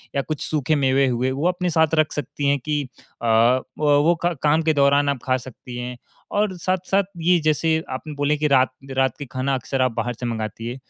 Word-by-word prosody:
या 140 - +2
कुछ 155 +1 -5
सूखे 155 0 0
मेवे 135 -1 +2
हुए 125 +1 0
वो 140 +6 0
अपने 180 0 0
साथ 160 -1 +2
रख 155 -1 +2
सकती 145 0 -3
हैं 140 0 +2
कि 150 +3 -1 0.4
अ, - - -4
व 115 +3 +4 0.4
वो 170 +3 +4
क 175 -1 +1
काम 155 +2 +3
के 160 0 +2
दौरान 140 0 +3
आप 140 -2 -1
खा 130 -1 +2
सकती 125 0 -10
हैं। 125 0 -5 0.3
और 205 -1 +1
साथ-साथ 185 +3 0 0.2
ये 175 +1 +4
जैसे 155 +1 +2 0.2
आपने 140 +4 -5
बोले 145 +1 +1
कि 150 +1 +1
रात 130 -2 +4 0.3
रात 130 -2 +2
का 145 - -5
खाना 130 +1 -1
अक्सर 130 +1 -2
आप 130 -1 +2
बाहर 120 +1 -2
से 125 - -4
मँगाती 115 -1 -4
है। 120 - -4
140 Hz, 220 wpm, -22 LUFS, 130-155 Hz, 0.4 s, व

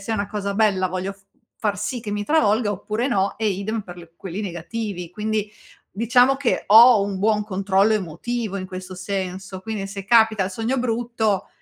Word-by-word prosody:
se 200 - -7
è - - +1
una 200 -2 -2
cosa 205 -1 -3
bella 200 -3 +2
voglio 185 +2 -3
f 195 - -26 0.4
far 205 -2 -1
sì 235 +4 -3
che 215 - -5
mi 205 0 -2
travolga 220 -6 +2
oppure 215 +5 -2
no, 200 -5 0
e 220 - 0
idem 205 +3 -2
per 175 -3 -12
quelli 190 +2 -5
negativi. 180 0 -5
Quindi, 210 +2 -2 0.4
diciamo 245 +5 +3
che 270 -3 0
ho 225 +1 +8
un 200 -1 -3
buon 210 +1 +2
controllo 200 +1 +2
emotivo 205 +3 -3
in 185 - -5
questo 185 0 -8
senso, 190 0 -5
quindi 215 -2 -4
se 195 0 -7
capita 220 -2 +4
il 185 - -4
sogno 225 +7 -2
brutto, 230 -4 -1
205 Hz, 185 wpm, -22 LUFS, 190-225 Hz, 0.4 s, ho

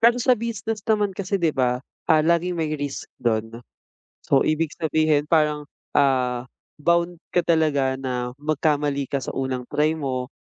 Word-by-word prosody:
Pero 235 +1 +5
sa 250 +1 +3
business 225 -2 -2
naman 210 -3 +2
kasi 200 +1 -2
'di 170 -4 +1
ba, 125 -2 +1 0.3
ah, 155 -1 +5
laging 170 +1 +2
may 155 -2 -1
risk 145 -2 -4 0.2
do'n. 115 0 -1 0.6
So, 135 -1 +2
ibig 155 0 +1
sabihin 155 -2 +2
parang, 150 -2 +2 0.3
ah, 130 -3 +2 0.3
bound 170 +2 +1 0.2
ka 175 - +4
talaga 145 -5 +2
na 125 -2 -3
magkamali 145 -2 0
ka 140 - 0
sa 130 - -5
unang 130 -2 -2
try 150 +3 +1
mo, 130 -2 -3
150 Hz, 155 wpm, -23 LUFS, 135-170 Hz, 0.6 s, Pero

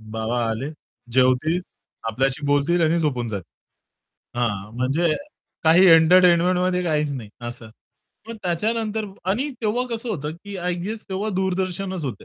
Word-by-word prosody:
बाबा 110 +2 -2
आले, 130 +6 -3 0.4
जेवतील, 130 +7 +3 0.5
आपल्याशी 135 +5 -1
बोलतील 145 +5 +2
आणि 165 +2 +3
झोपून 130 -7 -1
जातील. 100 -6 -6 0.9
हां, 105 -3 -2
म्हणजे 155 +6 +1 0.5
काही 170 +4 +7
एंटरटेनमेंटमध्ये 180 +2 +5
काहीच 150 -3 +1
नाही 115 -6 -7 0.2
असं. 115 -2 -9 0.6
मग 230 - -6
त्याच्यानंतर 215 +4 -1 0.3
आणि 255 +9 0
तेव्हा 235 +3 0
कसं 230 +1 -4
होतं 150 -8 -3
की 200 -1 -6
आय 180 0 -1
गेस 215 +2 -5
तेव्हा 195 +3 -2
दूरदर्शनच 185 -1 -2
होतं. 130 - -5
170 Hz, 130 wpm, -23 LUFS, 130-190 Hz, 0.9 s, काही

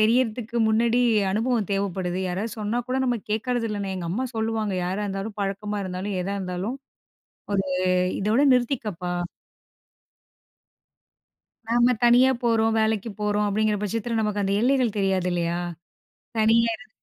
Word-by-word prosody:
தெரியிறதுக்கு 230 +1 +1
முன்னாடி 235 +2 +3 0.3
அனுபவம் 225 0 0
தேவப்படுது. 190 -2 -1
யாராவது 200 +5 -3
சொன்னா 215 +3 -1
கூட 255 +1 -1
நம்ம 245 -1 +1
கேட்கறது 235 +2 0
இல்லண்ணே. 200 -2 -3
எங்க 175 -2 -4
அம்மா 250 +8 -1
சொல்லுவாங்க 220 -2 -1
"யாரா 190 +4 -2
இருந்தாலும், 200 +2 -4
பழக்கமா 205 +1 -2
இருந்தாலும், 185 +2 -4
எதா 195 +2 -3
இருந்தாலும் 190 +6 -3 0.8
ஒரு 195 -1 +1 0.5
இதோட 215 +6 +2
நிறுத்திக்கப்பா." 220 -8 -1 2.6
நாம 240 +2 +4
தனியா 245 +2 +6
போறோம், 225 -1 +2
வேலக்கு 220 0 0
போறோம் 210 0 +1
அப்படீங்கிற 210 +1 +1
பட்சத்துல, 225 +2 -1
நமக்கு 210 -1 -1
அந்த 195 +1 0
எல்லைகள் 250 -3 +2
தெரியாது 190 -2 +1
இல்லயா? 170 0 -1 0.8
தனியா 225 +1 +4
இருந் 220 0 -16
215 Hz, 125 wpm, -25 LUFS, 195-230 Hz, 2.6 s, தனியா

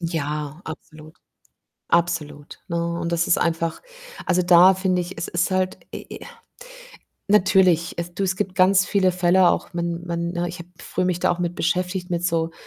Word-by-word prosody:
Ja, 150 -2 -4
absolut, 155 0 -11 0.7
absolut, 160 -4 -1
ne, 170 - -2 0.2
und 170 0 -3
das 170 0 +1
ist - - +4
einfach 165 0 -1 0.5
also, 180 -1 +2
da 180 +2 +7
finde 185 -1 0
ich, 175 +2 -6
es 165 - -4
ist 175 +2 0
halt, 185 0 -1
äh - - -7
äh - - -11 1.1
natürlich, 185 -4 +3
es 170 0 -5
du, 195 - -3
es 190 -1 0
gibt 190 -1 -3
ganz 190 0 +4
viele 185 -2 +2
Fälle 180 0 +4
auch, - - -2
wenn 170 0 -2
wenn, 170 0 -2
ne 175 0 -2
ich 175 +1 -8
habe 175 - -10
früh - - -3
mich 180 -1 0
da - - +2
auch 175 - -1
mit 175 -1 -2
beschäftigt 180 +1 -1
mit 175 0 -2
so 165 -1 0
175 Hz, 185 wpm, -22 LUFS, 170-185 Hz, 1.1 s, da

